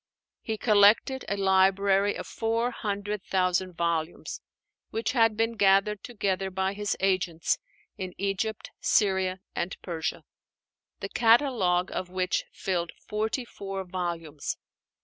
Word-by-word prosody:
He 220 -1 -3
collected 215 +5 +4
a 200 - 0
library 195 +1 +3
of - - -5
four 230 +2 -1
hundred 205 -2 -3
thousand 185 -1 +1
volumes, 170 -1 -2 0.5
which 225 0 -1
had 225 -4 +3
been 225 +1 +1
gathered 195 0 +3
together 195 -5 -1
by 190 +1 -1
his 205 0 -2
agents 185 -4 +1 0.4
in 185 -1 -5
Egypt, 200 +2 -2
Syria, 190 -3 +2
and 175 +2 -2
Persia: 165 -3 -3 0.8
the - - -4
catalogue 225 -7 +3
of 185 - -3
which 185 0 0
filled 175 -3 -2 0.2
forty 220 +4 -1
four 195 -3 -6
volumes. 170 -5 -4
195 Hz, 120 wpm, -28 LUFS, 185-215 Hz, 0.8 s, collected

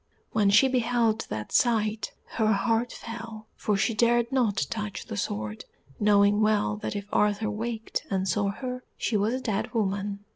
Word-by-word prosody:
When 210 -2 +3
she 210 +7 +6
beheld 235 -3 +1
that 105 0 -5
sight, 220 -3 +1 0.2
her 220 -1 +2
heart 225 +3 +1
fell, 225 -2 -8
for 210 -2 0
she 230 +4 +1
dared 235 +2 +2
not 225 - +1
touch 210 -2 -4
the - - -6
sword, 105 +1 -3 0.3
knowing 205 0 +4
well 215 -1 +2
that 210 - -4
if 200 -1 -4
Arthur 210 +1 +2
waked 225 +1 -4
and 190 -1 0
saw 200 0 +1
her 250 +4 -5
she 225 - -1
was 210 +4 +2
a - - -2
dead 220 0 -2
woman. 200 -1 -1
215 Hz, 170 wpm, -27 LUFS, 205-230 Hz, 0.3 s, she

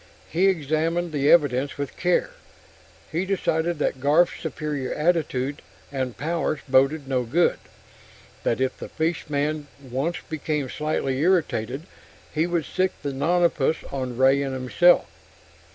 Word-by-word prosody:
He 180 +5 +3
examined 165 0 0
the 145 -1 +1
evidence 140 -4 +3
with 140 -1 -4
care. 180 - +1 0.8
He 170 +3 0
decided 175 -3 0
that 140 -3 -1
Garf's 150 +6 +3
superior 150 -4 -3
attitude 150 -4 0 0.3
and 130 -3 -3
powers 160 -1 -1
boded 135 +2 +3
no 130 -2 +1
good; 145 +9 +2 0.8
that 115 - 0
if 130 0 0
the - - -7
fishman 155 -2 -1
once 135 +5 -2
became 150 -3 -2
slightly 150 -3 -1
irritated 150 -6 +1 0.5
he 160 +2 +1
would 170 -3 -1
sic 185 0 0
the 140 -1 -2
nonapus 160 +1 +2
on 130 -3 -4
Ray 135 +2 +4
and 135 -1 -2
himself. 130 +8 +4
150 Hz, 130 wpm, -24 LUFS, 135-165 Hz, 0.8 s, Ray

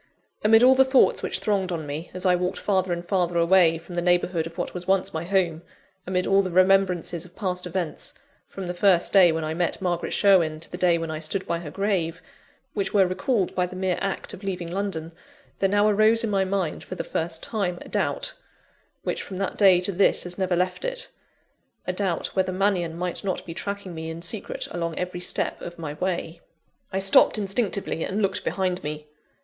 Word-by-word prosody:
Amid 225 +2 +6
all 260 +1 +8
the 265 0 +6
thoughts 265 0 +3
which - - 0
thronged 195 -3 0
on 160 -3 -3
me, 150 +4 -5
as 185 +1 -3
I 180 - +5
walked 180 +1 -2
farther 190 -3 0
and 175 0 -3
farther 175 -3 0
away 170 -1 +5
from 165 +2 -12
the 175 - -1
neighbourhood 175 -1 +1
of 165 - -13
what - - -3
was 180 0 -6
once 190 0 +1
my 160 0 -3
home; 175 -3 0 0.5
amid 180 0 0
all 195 0 +4
the 190 - -3
remembrances 185 -2 +2
of 180 - -14
past 180 -3 -2
events 175 -3 -3 0.3
from 195 - -7
the 175 - -3
first 180 -1 +3
day 185 -4 +7
when 160 0 -2
I 155 0 -2
met 175 +1 -1
Margaret 175 -2 -2
Sherwin 170 -6 +3
to 165 - -8
the 180 - -5
day 175 -2 +4
when 165 -1 -4
I 155 - -4
stood 165 +5 -3
by 170 - -1
her 165 -3 -7
grave 170 -2 -1 0.5
which 195 -1 -2
were 195 -2 +6
recalled 185 +2 0
by 180 -1 0
the 185 - -10
mere 185 -1 -1
act 195 -1 -3
of 200 - -10
leaving 180 -3 -4
London, 175 -4 -3 0.5
there 195 - +2
now 205 +1 +3
arose 215 +2 +4
in 225 - -1
my 195 -1 +2
mind, 185 -4 -2
for - - -7
the - - -3
first 165 0 -2
time, 195 -6 -2
a - - -10
doubt, - - -1 0.7
which - - -2
from 190 - -7
that 195 0 -2
day 190 -3 +6
to 185 - 0
this 195 +1 +3
has 180 0 -5
never 185 -2 0
left 180 - -1
it; - - -3 0.8
a 185 - -1
doubt 185 -3 -2
whether 185 -1 +1
Mannion 185 -3 0
might 180 +2 -3
not 190 -2 -2
be 165 - -6
tracking 200 0 -5
me 160 0 -6
in 165 +1 -6
secret 195 +4 -3
along 170 -2 -3
every 180 0 -3
step 180 - -2
of 175 0 -8
my 155 -3 -5
way. 170 0 -3 0.5
I 190 - -2
stopped 195 +3 +5
instinctively, 200 -4 -1
and 195 - -2
looked 195 -1 0
behind 185 -2 -1
me. 150 0 -5
180 Hz, 215 wpm, -25 LUFS, 170-195 Hz, 0.8 s, all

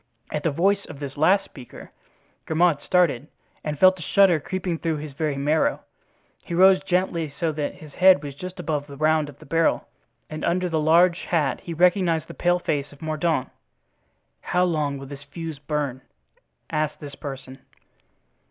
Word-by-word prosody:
At 150 - -2
the 165 - +1
voice 195 +7 +1
of 140 - -10
this 140 -2 -6
last 185 +7 +3
speaker, 125 -5 -12 0.6
Grimaud 160 -1 +2
started 150 -7 +1 0.4
and 150 -1 -3
felt 185 +3 +5
a - - -8
shudder 180 +1 +4
creeping 180 +1 -3
through 165 -2 -1
his 150 -1 -7
very 150 0 -2
marrow. 150 +3 +1 0.6
He 170 - -5
rose 190 +1 +6
gently, 180 -4 -1
so 165 -2 +1
that 150 -1 -3
his 150 -2 -13
head 185 -5 +5
was 145 -1 -6
just 185 +6 -8
above 150 -2 -2
the 140 -1 -10
round 155 0 +2
of 140 - -13
the - - -15
barrel, 165 +3 +1 0.4
and 155 - -7
under 180 +1 0
the 160 -2 0
large 170 +3 +4
hat 150 -6 0
he 170 - -6
recognized 175 -1 +2
the - - -9
pale 175 0 +2
face 145 -5 -2
of 145 +2 -14
Mordaunt. 155 -3 -1 0.9
"How 180 - +1
long 150 -5 0
will 135 - -8
this 140 +1 -10
fuse 160 -1 -7
burn?" 145 -3 -3 0.7
asked 155 -1 -1
this 145 -2 -9
person. 135 -2 -8
155 Hz, 175 wpm, -24 LUFS, 145-175 Hz, 0.9 s, rose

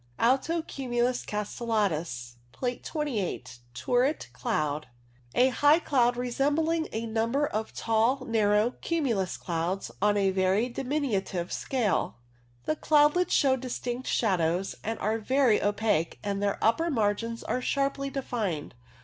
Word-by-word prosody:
Alto 275 +7 +2
cumulus 245 -3 -1
castellatus 195 - -2 0.2
(Plate 250 -1 -3
28). 205 - -3 0.2
Turret 245 - 0
cloud. 150 +3 -2 0.4
STRATUS - - -22
i6i 255 - +5
A - - +2
high 290 +4 +5
cloud 245 -7 +2
resembling 295 +6 0
a 225 +1 -3
number 230 +6 0
of 220 -5 -3
tall 230 +4 +1
narrow 215 0 +2
cumulus 240 - -1
clouds 175 +3 -3
on 205 0 +3
a 195 -1 +2
very 190 +4 +2
diminutive 240 - -2
scale. 240 -7 0 0.5
The 310 - 0
cloudlets 300 +5 +3
show 270 -2 +4
distinct 250 0 -4
shadows, 180 -3 +1
are 225 0 -1
very 255 0 +3
opaque, 205 -5 0
and 200 -1 -2
their 200 -1 0
upper 325 +10 +3
margins 230 -2 -1
are 255 - -1
sharply 275 +1 -1
defined. 220 - -3
230 Hz, 125 wpm, -28 LUFS, 200-270 Hz, 0.5 s, i6i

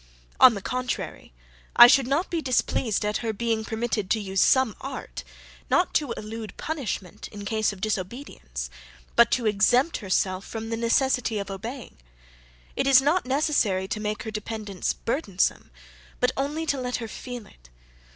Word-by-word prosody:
On 250 -3 +8
the 200 - -6
contrary, 255 - -4 0.4
I 240 - +12
should 255 +1 +5
not 290 +7 0
be 335 -2 -1
displeased 245 -5 0
at 210 0 0
her 230 -2 -2
being 225 0 -1
permitted 220 -3 -2
to 220 - +2
use 190 -2 -1
some 260 -5 +4
art, 270 -1 -6 0.5
not 360 - +2
to 290 -5 +1
elude 220 0 -7
punishment 250 - -4
in 205 -1 -9
case 215 +1 +1
of 195 -2 -11
disobedience, 185 - -4 0.4
but 235 0 +6
to 245 - 0
exempt 230 +9 +3
herself 185 -1 0
from 225 +1 -6
the - - 0
necessity 235 0 +1
of 200 -1 -4
obeying. 230 +7 -7 0.8
It - - 0
is 270 -1 +8
not 295 +3 +1
necessary 260 -9 +1
to 215 - -2
make 210 0 -3
her 220 - -5
dependence 210 -3 -3
burdensome, 225 - -1 0.5
but - - +3
only 295 +4 -2
to 285 -4 -1
let 250 0 -2
her 230 - -4
feel 245 0 -7
it. - - -20
225 Hz, 160 wpm, -25 LUFS, 205-260 Hz, 0.8 s, I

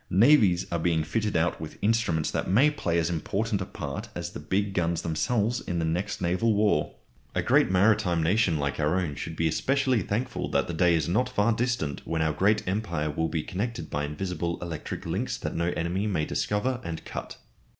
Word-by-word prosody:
Navies 100 -4 +5
are 85 - 0
being 80 -1 +1
fitted 105 +4 -1
out 80 +1 0
with 80 - -7
instruments 105 -8 +1
that - - -2
may 130 +11 +5
play 85 - -1
as 80 -2 +1
important 100 +5 -1
a 95 - -4
part - - -6
as - - -4
the - - -7
big 100 +1 -1
guns 85 -2 0
themselves 110 - 0
in 85 - -3
the 85 - 0
next 90 +5 -2
naval 100 +6 +2
war. 105 -7 +1 0.4
A - - +1
great - - +4
maritime 90 -3 +3
nation 90 -1 +2
like 70 0 -2
our 75 +5 +2
own 85 -6 -2
should 80 +3 -6
be 80 0 +1
especially 130 - +1
thankful 120 +5 -2
that - - +1
the 85 - -4
day 85 +1 +3
is 80 -3 0
not 105 +9 +1
far 105 +3 +2
distant 115 - -1
when 80 -1 -1
our 80 -1 +1
great 100 +6 +2
empire 90 -6 -1
will 80 +2 -1
be 80 -2 -2
connected 100 -4 -4
by 75 0 -1
invisible 85 +2 -3
electric 85 -3 -6
links - - -2
that - - -4
no 85 +1 0
enemy 90 +5 -1
may 80 -7 0
discover 120 +9 -1
and 85 -1 -6
cut. - - -6
90 Hz, 200 wpm, -27 LUFS, 80-105 Hz, 0.4 s, Navies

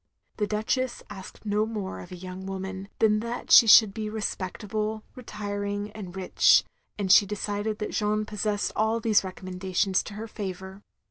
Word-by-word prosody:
The 210 - 0
Duchess 230 +5 -1
asked 195 +1 -11
no 210 0 +1
more 210 - -4
of 90 - -11
a - - -6
yotmg 185 +1 -8
woman 190 0 -6
than 215 -1 +3
that 235 +2 -5
she 230 - +9
should 215 -2 +8
be 215 -1 -4
respectable, 215 +1 -3
retiring, 205 -3 -4
and 195 -4 -9
rich; 190 -1 +4 0.3
and 195 -3 0
she 200 0 +7
decided 210 +1 -3
that 210 - -4
Jeanne 215 0 0
possessed 210 -1 -2
all 220 +2 +1
these 220 -3 +3
recommendations 185 +1 -1
to 205 - -8
her 220 +2 -6
favour. 190 -2 -7
205 Hz, 160 wpm, -27 LUFS, 190-215 Hz, 0.3 s, she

